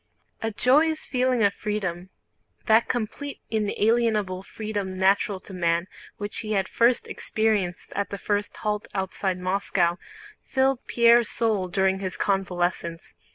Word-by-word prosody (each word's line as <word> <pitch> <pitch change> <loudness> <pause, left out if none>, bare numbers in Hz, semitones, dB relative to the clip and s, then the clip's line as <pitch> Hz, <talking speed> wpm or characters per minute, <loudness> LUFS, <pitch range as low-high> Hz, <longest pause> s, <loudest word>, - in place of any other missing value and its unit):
A 225 - 0
joyous 300 +8 +2
feeling 255 -2 +1
of 200 0 +4
freedom—that 210 +3 -2
complete 245 +5 -3
inalienable 215 -2 +1
freedom 205 -2 -4
natural 195 +1 +2
to 195 - -12
man 170 -1 +1 0.3
which 205 0 -5
he 215 -1 -3
had 195 -2 +1
first 235 +1 +2
experienced 210 -5 -1
at 200 0 -1
the 200 - -4
first 205 +1 -2
halt 210 -1 -2
outside 190 -1 -1
Moscow—filled 195 +8 -1
Pierre's 235 -1 +5
soul 215 -5 0
during 190 +1 +1
his 185 -1 -4
convalescence. 175 -3 -1
205 Hz, 120 wpm, -25 LUFS, 190-225 Hz, 0.3 s, Pierre's